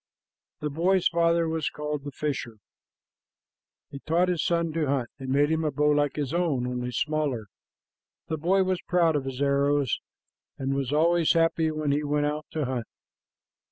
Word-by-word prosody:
The 150 -1 -2
boy's 180 +5 +2
father 170 0 +2
was 160 -2 -1
called 150 -1 -4
the 145 - -5
fisher. 135 -6 -4 1.3
He 140 - -7
taught 170 +5 +1
his 175 -4 0
little 170 -1 +1
son - - -10
to 160 -2 0
hunt, 135 -3 0
and 130 -1 -6
made 145 +3 +3
him 160 0 +1
a 155 - +1
bow 150 +1 +2
like 145 -1 +1
his 145 -1 -2
own, 160 -8 +1
only 125 0 -3
smaller. 145 -4 -1 0.8
The 160 - -2
boy 190 +5 +3
was 185 -1 -1
proud 170 -3 +2
of 140 -2 -1
his 135 +1 -3
arrows, 140 -1 +2 0.6
and 135 0 -2
was 135 -1 -2
always 165 +2 +3
happy 165 -1 +2
when 155 -2 -1
he 145 +2 +1
went 145 0 0
out 150 +1 -3
to 155 -3 -2
hunt. 125 -3 -3
150 Hz, 180 wpm, -27 LUFS, 140-165 Hz, 1.3 s, made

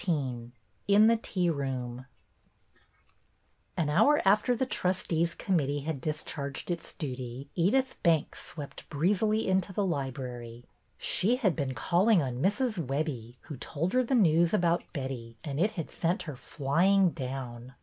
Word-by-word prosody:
XIX 130 -9 -2 0.4
IN 205 +2 +6
THE 230 +1 +6
TEA 180 -5 0
ROOM 130 -3 -4 1.7
AN 165 - +1
hour 250 - +5
after 210 +5 +4
the 260 - 0
trustees' 170 -6 0
committee 145 -7 0
had 145 -2 -4
discharged 150 0 -4
its 170 -1 -4
duty 130 -1 -6
Edyth 260 +10 +2
Banks 165 -3 +1
swept 145 -3 -9
breezily 205 +8 +1
into 190 0 +1
the 200 +1 0
library. 125 -6 -4 0.3
She 225 +7 +2
had 215 - +1
been 135 -4 -2
calling 185 - +3
on 130 -4 -2
Mrs. 215 - +1
Webbie, 135 -4 -3
who 145 - -8
told 165 +8 -3
her 255 0 +4
the 260 +2 0
news 170 -3 +4
about 175 -3 +1
Betty, 130 -6 -5
and 145 -2 -4
it 210 +5 +2
had 165 - -4
sent 170 +2 -1
her 150 -4 -6
flying 170 +9 +2
down. 130 -3 -6
160 Hz, 145 wpm, -29 LUFS, 135-190 Hz, 1.7 s, IN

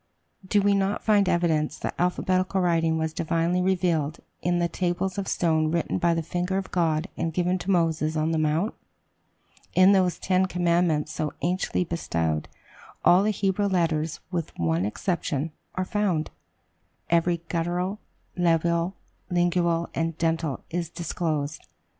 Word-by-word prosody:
Do 200 +1 +2
we 200 0 +4
not 195 +1 0
find 205 -3 +4
evidence, 160 -3 +1
that - - -4
alphabetical 185 +1 +1
writing 165 -2 +2
was 160 0 -1
divinely 165 +3 0
revealed, 175 -5 +1 0.2
in 175 0 +1
the 175 0 +2
tables 180 +2 -1
of 195 - -3
stone 160 -2 +1
written 170 +1 -1
by 170 -1 +2
the 165 - -1
finger 180 +4 -2
of 195 - -4
God 165 -1 +1
and 165 0 -1
given 180 +2 0
to 180 - -6
Moses 160 -3 +1
on 155 +1 +1
the 160 - +1
Mount? 155 +7 +1 1.0
In 185 +1 +7
those 185 -3 +3
ten 185 0 +1
commandments 170 -4 +1
so 155 -1 -3
anciently 180 +1 0
bestowed, 80 - -2 0.6
all 180 +2 +7
the 210 - +2
Hebrew 200 0 +1
letters, 165 -4 0
with 170 -3 -3
one 85 +2 +1
exception, 155 - -2 0.2
are 185 - -1
found 185 -7 0 0.8
every 170 0 +2
guttural, 180 +4 -1 0.4
labial, 170 +1 +1 0.3
lingual, 175 -1 +1
and 165 -1 -2
dental 165 -4 -1
is 170 -1 -2
disclosed. 160 -3 -3
170 Hz, 145 wpm, -26 LUFS, 160-185 Hz, 1.0 s, In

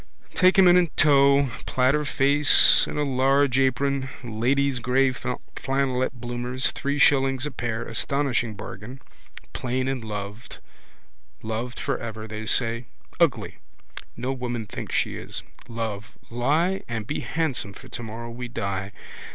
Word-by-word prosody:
Take 185 +1 +4
him 190 -1 +7
in 175 0 +6
tow, 140 -2 +5 0.2
platter 130 +4 +2
face 145 +1 +5
and - - -5
a 150 - +1
large 135 0 +2
apron. 135 +1 +1
Ladies' 125 +4 0
grey 130 +2 +2
flannelette 130 +1 -2
bloomers, 120 +1 -2
three 140 +1 -2
shillings 135 -2 +3
a 150 - -3
pair, 120 -3 -3
astonishing 120 -1 -1
bargain. 105 +7 -9 0.5
Plain 130 +1 -2
and 135 -3 -2
loved, 105 +1 -7 0.9
loved 115 +3 -4
for 135 -3 -2
ever, 110 -1 -6
they 110 0 -6
say. 115 0 +1 0.3
Ugly: - - +1 0.6
no 130 +2 -2
woman 120 -3 -4
thinks - - -6
she - - 0
is. - - -7 0.2
Love, 115 -2 -5 0.2
lie 155 +11 +1
and 110 -2 -4
be 145 - -3
handsome 140 -11 -2
for 130 - -13
tomorrow 115 -1 -7
we 125 +1 -6
die. 100 -4 -4
125 Hz, 135 wpm, -25 LUFS, 115-140 Hz, 0.9 s, him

